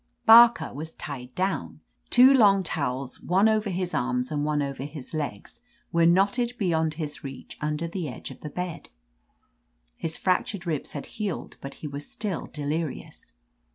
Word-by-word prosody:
Barlcer 235 Hz, +1 st, +8 dB
was 160 Hz, +3 st, -7 dB
tied 125 Hz, -3 st, -8 dB
down. 190 Hz, +1 st, -2 dB, 0.3 s
Two 255 Hz, +2 st, +8 dB
long 200 Hz, -6 st, +5 dB
towels, 135 Hz, -5 st, -3 dB
one 190 Hz, +5 st, +3 dB
over 215 Hz, -1 st, +1 dB
his 180 Hz, -1 st, -2 dB
arms 125 Hz, +1 st, -1 dB
and 145 Hz, -1 st, -1 dB
one 150 Hz, -1 st, +1 dB
over 140 Hz, -1 st, -5 dB
his 145 Hz, -1 st, -8 dB
legs, 145 Hz, -10 st, -5 dB, 0.3 s
were 170 Hz, 0 st, +4 dB
knotted 200 Hz, +7 st, +3 dB
beyond 160 Hz, -7 st, 0 dB
his 150 Hz, -2 st, -5 dB
reach 135 Hz, -2 st, -8 dB
under 150 Hz, +2 st, -1 dB
the 170 Hz, -3 st, -4 dB
edge 125 Hz, -, -8 dB
of -, -, -12 dB
the 150 Hz, -, -7 dB
bed. 180 Hz, +2 st, -5 dB, 1.1 s
His 160 Hz, 0 st, -4 dB
fractured 185 Hz, 0 st, 0 dB
ribs 155 Hz, -5 st, -2 dB
had 145 Hz, -, -5 dB
healed, 210 Hz, -5 st, -5 dB
but 140 Hz, -, -7 dB
he -, -, -2 dB
was 145 Hz, 0 st, -6 dB
still 205 Hz, -6 st, -3 dB
delirious. 150 Hz, +1 st, -5 dB
160 Hz, 160 wpm, -26 LUFS, 145-195 Hz, 1.1 s, Barlcer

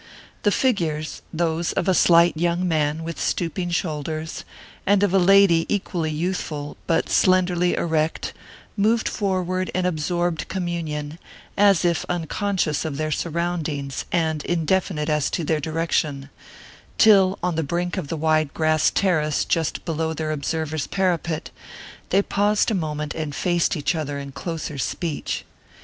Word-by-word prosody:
The 205 Hz, -, +3 dB
figures 165 Hz, -, 0 dB
those 165 Hz, 0 st, -1 dB
of -, -, -1 dB
a 190 Hz, -, +4 dB
slight 170 Hz, -1 st, +5 dB
young 175 Hz, +2 st, 0 dB
man 155 Hz, -1 st, 0 dB
with 165 Hz, 0 st, -5 dB
stooping 175 Hz, +1 st, -1 dB
shoulders, 160 Hz, -2 st, -3 dB, 0.4 s
and 200 Hz, 0 st, +3 dB
of 200 Hz, -2 st, +2 dB
a 195 Hz, -, +5 dB
lady 185 Hz, -3 st, +5 dB
equally 175 Hz, -5 st, -1 dB
youthful 155 Hz, -2 st, -3 dB
but 165 Hz, -1 st, +1 dB
slenderly 180 Hz, -1 st, +3 dB
erect 160 Hz, -1 st, -1 dB, 0.4 s
moved 220 Hz, +3 st, +2 dB
forward 185 Hz, -2 st, -1 dB
in 185 Hz, -1 st, +1 dB
absorbed 175 Hz, 0 st, -1 dB
communion, 165 Hz, -4 st, -4 dB, 0.4 s
as 200 Hz, -3 st, +4 dB
if 170 Hz, -1 st, +1 dB
unconscious 175 Hz, -1 st, -1 dB
of 155 Hz, -4 st, -4 dB
their 155 Hz, 0 st, -2 dB
surroundings 160 Hz, -4 st, -2 dB
and 160 Hz, -3 st, 0 dB
indefinite 175 Hz, -1 st, 0 dB
as 150 Hz, -2 st, +1 dB
to 170 Hz, -, -2 dB
their 155 Hz, 0 st, +1 dB
direction, 155 Hz, -3 st, -1 dB, 0.7 s
till, 195 Hz, -3 st, +6 dB
on 180 Hz, -1 st, +1 dB
the 160 Hz, -, 0 dB
brink 175 Hz, +4 st, -2 dB
of 185 Hz, -7 st, -3 dB
the 165 Hz, -, -3 dB
wide 155 Hz, -1 st, +2 dB
grass 155 Hz, -1 st, +3 dB
terrace 155 Hz, -6 st, +1 dB
just 165 Hz, -3 st, -1 dB
below 160 Hz, 0 st, -1 dB
their 155 Hz, 0 st, -2 dB
observer's 155 Hz, +1 st, -2 dB
parapet, 175 Hz, -4 st, -1 dB, 0.6 s
they 195 Hz, +2 st, +3 dB
paused 205 Hz, +2 st, +1 dB
a -, -, +1 dB
moment 150 Hz, -5 st, -2 dB
and 155 Hz, -2 st, -4 dB
faced 175 Hz, -1 st, +1 dB
each 145 Hz, +2 st, 0 dB
other 145 Hz, -3 st, -3 dB
in 140 Hz, -1 st, -6 dB
closer 160 Hz, -1 st, -5 dB
speech. 160 Hz, +5 st, -3 dB
165 Hz, 145 wpm, -23 LUFS, 155-180 Hz, 0.7 s, till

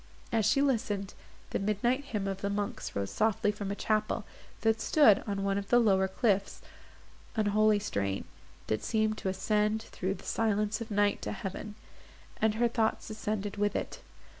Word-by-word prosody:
As 220 Hz, -2 st, +2 dB
she 275 Hz, +5 st, +3 dB
listened, 210 Hz, -7 st, 0 dB, 0.4 s
the -, -, 0 dB
midnight 225 Hz, +7 st, 0 dB
hymn 210 Hz, -7 st, -3 dB
of 195 Hz, 0 st, -3 dB
the 200 Hz, -, -1 dB
monks 205 Hz, 0 st, -3 dB
rose 100 Hz, -1 st, -2 dB
softly 215 Hz, -1 st, +2 dB
from 205 Hz, -1 st, -5 dB
a 200 Hz, -, -2 dB
chapel, 215 Hz, 0 st, 0 dB, 0.4 s
that 225 Hz, 0 st, +2 dB
stood 225 Hz, -10 st, +5 dB
on 200 Hz, -1 st, -2 dB
one 195 Hz, 0 st, +1 dB
of 200 Hz, -, -8 dB
the 240 Hz, -, +6 dB
lower 195 Hz, -5 st, +4 dB
cliffs, 200 Hz, 0 st, 0 dB, 0.8 s
a 215 Hz, -1 st, +2 dB
holy 215 Hz, +1 st, +4 dB
strain, 100 Hz, -, -2 dB, 0.4 s
that 110 Hz, -1 st, -1 dB
seemed 215 Hz, -1 st, 0 dB
to 190 Hz, -, -2 dB
ascend 210 Hz, +3 st, +1 dB
through 190 Hz, -2 st, -3 dB
the -, -, -13 dB
silence 210 Hz, -1 st, 0 dB
of 230 Hz, -, -5 dB
night 205 Hz, -1 st, +2 dB
to 105 Hz, -, -3 dB
heaven, 195 Hz, -, -6 dB, 0.7 s
and 215 Hz, -1 st, +3 dB
her 240 Hz, +2 st, +3 dB
thoughts 225 Hz, -1 st, -1 dB
ascended 210 Hz, -1 st, -3 dB
with 205 Hz, 0 st, +1 dB
it. -, -, -3 dB
210 Hz, 175 wpm, -30 LUFS, 195-220 Hz, 0.8 s, the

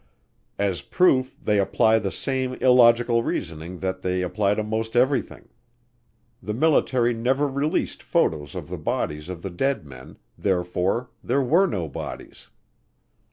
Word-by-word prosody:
As 100 Hz, -3 st, -1 dB
proof 130 Hz, -9 st, +2 dB
they 105 Hz, -1 st, +1 dB
apply 110 Hz, +3 st, +3 dB
the 100 Hz, -2 st, -2 dB
same 130 Hz, +4 st, -2 dB
illogical 120 Hz, -2 st, +4 dB
reasoning 85 Hz, -4 st, -4 dB
that 95 Hz, -1 st, -3 dB
they 90 Hz, 0 st, -1 dB
apply 100 Hz, +2 st, 0 dB
to 110 Hz, -, -1 dB
most 110 Hz, +2 st, -3 dB
everything. 130 Hz, +3 st, 0 dB, 0.9 s
The 105 Hz, -2 st, -4 dB
military 130 Hz, -4 st, +2 dB
never 130 Hz, +5 st, +1 dB
released 140 Hz, +3 st, -1 dB
photos 75 Hz, -3 st, 0 dB
of -, -, -6 dB
the -, -, -6 dB
bodies 75 Hz, +3 st, -3 dB
of 90 Hz, -2 st, -7 dB
the 95 Hz, -, -4 dB
dead 120 Hz, -, -1 dB
men, 65 Hz, -2 st, -12 dB, 0.2 s
therefore 95 Hz, +5 st, -1 dB
there 140 Hz, -, +1 dB
were 170 Hz, +10 st, +4 dB
no 90 Hz, -, -3 dB
bodies. 70 Hz, -, -8 dB
110 Hz, 140 wpm, -24 LUFS, 90-130 Hz, 0.9 s, illogical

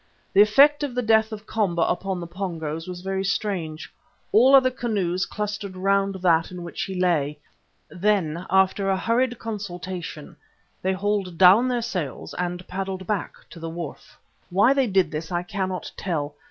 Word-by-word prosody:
The 195 Hz, -, +7 dB
effect 280 Hz, +8 st, +6 dB
of 280 Hz, -4 st, -3 dB
the 250 Hz, -, 0 dB
death 220 Hz, 0 st, +3 dB
of 215 Hz, 0 st, -7 dB
Komba 185 Hz, -7 st, 0 dB
upon 190 Hz, 0 st, -2 dB
the 170 Hz, -, -5 dB
Pongos 165 Hz, -3 st, -5 dB
was 180 Hz, -1 st, -6 dB
very 190 Hz, +1 st, -2 dB
strange. 180 Hz, -5 st, -3 dB, 0.4 s
All 240 Hz, +5 st, +6 dB
the -, -, +11 dB
other 255 Hz, -1 st, +3 dB
canoes 200 Hz, -8 st, -1 dB
clustered 210 Hz, -2 st, -4 dB
round 195 Hz, +1 st, +1 dB
that 165 Hz, -2 st, +3 dB
in 180 Hz, -1 st, -7 dB
which 170 Hz, -, -6 dB
he 190 Hz, -1 st, -5 dB
lay. 150 Hz, -5 st, +1 dB, 0.5 s
Then, 180 Hz, -3 st, 0 dB
after 190 Hz, +1 st, +2 dB
a 190 Hz, -, +2 dB
hurried 240 Hz, +4 st, +1 dB
consultation, 185 Hz, -7 st, -6 dB, 0.4 s
they 190 Hz, +1 st, +1 dB
hauled 195 Hz, -2 st, -1 dB
down 190 Hz, +7 st, +7 dB
their 245 Hz, -2 st, 0 dB
sails 180 Hz, -, -4 dB
and 180 Hz, 0 st, -3 dB
paddled 190 Hz, 0 st, -4 dB
back 200 Hz, -1 st, -2 dB, 0.2 s
to 170 Hz, -, -11 dB
the 165 Hz, 0 st, -5 dB
wharf. 165 Hz, -3 st, -8 dB, 0.3 s
Why 205 Hz, +9 st, +4 dB
they 270 Hz, -2 st, +2 dB
did 190 Hz, -5 st, +2 dB
this 160 Hz, +2 st, -5 dB
I 175 Hz, 0 st, -1 dB
cannot 185 Hz, 0 st, -4 dB
tell. 150 Hz, -6 st, -3 dB
190 Hz, 170 wpm, -24 LUFS, 175-210 Hz, 0.5 s, the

